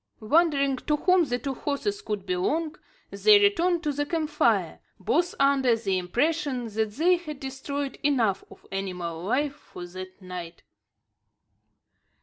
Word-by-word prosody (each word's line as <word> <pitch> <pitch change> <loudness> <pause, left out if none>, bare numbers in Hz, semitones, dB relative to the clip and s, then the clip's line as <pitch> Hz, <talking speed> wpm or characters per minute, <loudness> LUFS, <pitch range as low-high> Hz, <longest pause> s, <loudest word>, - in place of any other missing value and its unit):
Wondering 280 +1 +2
to 300 +4 0
whom 365 +2 +3
the 245 -3 -1
two 270 +3 -4
horses 350 - -3
could 210 - -4
belong, 290 - -1 0.4
they 425 -1 +6
returned 360 -4 +2
to 300 - 0
the 290 +1 -1
camp 315 -1 -2
fire; - - +1 0.2
both 350 +1 0
under 275 -3 +4
the 195 -5 -1
impression 255 - -1
that 215 0 -2
they 350 +8 +3
had 305 -5 -8
destroyed 270 0 -5
enough 235 -9 +1
of - - -16
animal 180 -4 -4
life 275 +8 0
for 235 -11 -11
that 185 +2 -9
night. 180 -3 -8
275 Hz, 140 wpm, -26 LUFS, 200-315 Hz, 0.4 s, they